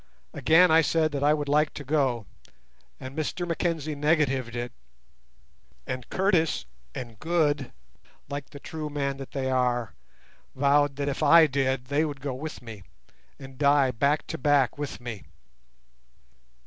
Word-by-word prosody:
Again 165 +2 +5
I 160 +1 +6
said 160 0 +1
that 140 -1 -2
I 150 +1 +4
would 150 -1 -3 0.4
go, 130 -6 0 0.7
and 130 +4 -7
again 175 +3 -3
Mackenzie 165 -2 -1
negatived 145 -5 +1
it, 120 0 -4 1.1
and 130 -1 -5
Curtis 180 - +1 0.3
and 115 -4 -7
Good, 150 -5 0 0.6
like 140 0 -6
the 140 - -11
true 155 +1 -6
men 140 -2 -2
that 135 -1 -8
they 130 -1 -1
are, 125 -3 0 0.6
vowed 140 +1 +3
that, 140 0 -3
if 140 - -2
I 160 +2 +7
did, 135 -3 0
they 145 +4 +1
would 145 -3 -4
go 135 0 -4
with 145 +1 -7
me, 110 -4 -9 0.6
and 135 -2 -12
die 140 -2 +4
back 140 +6 +1
to - - -5
back 140 -2 +3
with 145 -1 -5
me. 120 -5 -7
140 Hz, 145 wpm, -26 LUFS, 130-155 Hz, 1.1 s, I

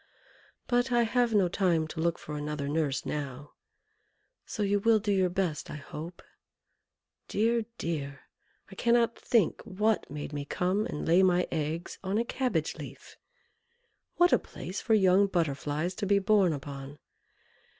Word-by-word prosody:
But 245 +1 +1
I 240 -1 +4
have 240 +1 +1
no 195 -3 +4
time 170 -3 +1
to 160 - -7
look 170 +1 +1
for 150 - -7
another 150 -1 -3
nurse 145 -2 -1
now, 145 -1 -5 1.0
so 210 - -2
you 205 0 +2
will 225 +2 +4
do 210 0 -1
your 190 -2 +3
best, 175 -4 -2
I - - -6
hope. 155 +4 -8 1.0
Dear! 230 +1 +1
dear! 140 -5 -4 0.5
I - - -8
cannot 235 +2 +2
think 225 -9 +1
what 215 +3 0
made 145 +1 -6
me 145 -1 -3
come 185 +8 0
and 150 - -5
lay 170 +3 +5
my 180 -1 +3
eggs 160 +2 -3
on 195 +2 -1
a 230 - +1
cabbage 255 +1 -1
leaf! - - -10 1.0
What 350 0 +4
a - - +5
place 185 - -7
for 225 - +3
young 195 0 +5
Butterflies 155 -1 -1
to 200 - -2
be 200 +1 +4
born 200 -2 +3
upon! 140 -1 -7
180 Hz, 155 wpm, -29 LUFS, 150-210 Hz, 1.0 s, lay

